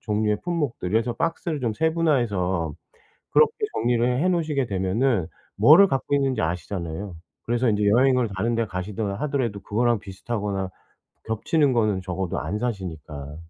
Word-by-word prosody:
종류의 105 -1 0
품목들 150 - -2
그래서 115 +3 +1
박스를 165 -2 -2
좀 115 -3 0
세분화해서 115 - 0 0.6
그렇게 460 0 +5 0.2
정리를 120 +1 +1
해 180 - +2
놓으시게 155 -6 0
되면은 95 +1 0 0.3
뭐를 155 - +8
갖고 135 -1 0
있는지 135 -2 +1
아시잖아요. 85 +2 -4 0.3
그래서 120 +1 +1
인제 105 -1 +1
여행을 125 +1 +4
다른 115 +4 0
데 115 - +1
가시던 100 +2 -4
하더라도 120 -3 -2
그거랑 120 +2 +1
비슷하거나 100 -1 -4 0.6
겹치는 135 +6 +1
거는 110 -5 +1
적어도 95 0 -3
안 95 +8 -3
사시니까. 80 - -5
110 Hz, 370 characters per minute, -24 LUFS, 95-130 Hz, 0.6 s, 뭐를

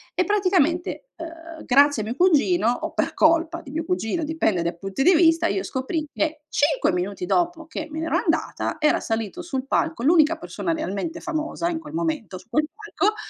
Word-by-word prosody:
e 365 - +2
praticamente, 365 - +1
uhm, 330 -1 -9
grazie 280 -2 +4
a - - -6
mio 230 +3 -4
cugino, 350 -3 +3
o 245 - -2
per - - -1
colpa 330 +1 +3
di 270 - -11
mio 320 +2 -2
cugino- 330 - -1
dipende 295 - 0
dai 170 0 -3
punti 195 +6 -4
di 360 +4 +6
vista, 330 0 +4
io 385 - -1
scoprii 300 +4 -3
che, 310 -1 -2
5 290 -3 +2
minuti 180 +1 -3
dopo 345 - 0
che 315 -1 -5
me 310 - -7
ne 320 - -2
ero - - +2
andata, - - -1
era 300 -1 +3
salito 225 - -3
sul 270 -7 -4
palco, 320 -2 0
l'unica 320 +1 +4
persona 335 +1 -4
realmente 315 - -3
famosa, 320 0 -2
in 330 -2 -2
quel 300 -1 -11
momento, 310 - -2
su 185 - -16
quel 300 +5 +1
palco, 425 0 -1
320 Hz, 195 wpm, -23 LUFS, 270-335 Hz, -, di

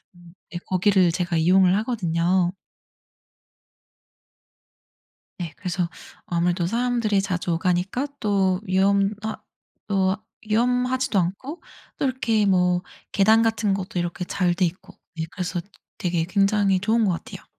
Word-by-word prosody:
음 175 -1 -17 0.2
네 175 - -4
거기를 185 -2 +3
제가 175 -1 -1
이용을 180 +3 +4
하거든요. 180 -5 +1 2.9
네. 170 -4 -5
그래서 180 -2 -2 0.4
아무래도 175 0 0
사람들이 230 -1 +1
자주 180 -2 -2
오가니까 180 - 0
또 195 -3 +1
위험하 200 +2 +1 0.5
또 190 -1 +2 0.3
위험하지도 250 +1 +1
않고 200 - -3 0.4
또 - - -1
이렇게 230 -5 +1
뭐 180 -2 +3 0.3
계단 220 +3 +5
같은 220 -3 +1
것도 185 -2 -3
이렇게 175 +1 -3
잘 180 -1 0
돼 180 +1 +1
있고. 170 +3 -6 0.3
예 - - 0
그래서 180 -2 -3 0.4
되게 175 -4 0
굉장히 195 0 +2
좋은 225 +4 +2
것 190 - +2
같아요. 170 - -7
190 Hz, 265 characters per minute, -24 LUFS, 180-215 Hz, 2.9 s, 계단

